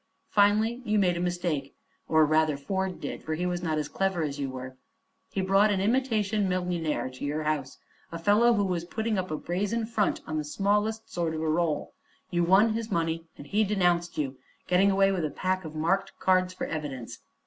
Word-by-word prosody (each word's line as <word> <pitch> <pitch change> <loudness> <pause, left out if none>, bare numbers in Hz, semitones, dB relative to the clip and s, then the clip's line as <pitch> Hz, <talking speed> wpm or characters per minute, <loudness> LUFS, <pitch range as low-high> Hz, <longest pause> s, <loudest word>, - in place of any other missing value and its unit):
"Finally 215 +4 +3
you 215 -2 +1
made 180 -3 +3
a - - -3
mistake 175 -5 -2 0.3
or 160 -1 +5
rather 155 -1 +2
Ford 190 +5 -2
did, - - -5
for 155 - -3
he 175 +3 -2
was 180 -1 -1
not 160 -3 -1
as 150 -1 -1
clever 190 0 -1
as 145 -1 -3
you 140 -1 -2
were. 130 0 -7 0.6
He 195 - -1
brought 195 +3 +4
an 200 -2 +1
imitation 215 -3 +1
millionaire 180 -5 -1
to 130 - -10
your 150 +2 -1
house; 150 -3 -2 0.3
a 165 - -4
fellow 210 +7 +4
who 205 -1 +2
was 180 -3 -1
putting 220 +3 -2
up 185 0 -3
a 155 - -2
brazen 205 +8 -1
front 220 -3 0
on 155 0 -2
the - - -2
smallest 210 +7 -1
sort 165 -2 -1
of 155 - -3
a - - 0
roll. 155 -1 0 0.4
You 175 0 +2
won 195 +6 +5
his 225 0 -3
money 165 -1 -1
and 145 - -10
he 210 +9 +2
denounced 175 -4 +1
you, 135 -3 -2 0.3
getting 185 +2 +4
away 195 0 +4
with 185 -4 -1
a 155 - 0
pack 185 +4 -2
of 155 0 -8
marked 190 +5 0
cards 185 -1 +2
for 185 - -4
evidence. 145 -7 -5
180 Hz, 205 wpm, -28 LUFS, 155-200 Hz, 0.6 s, or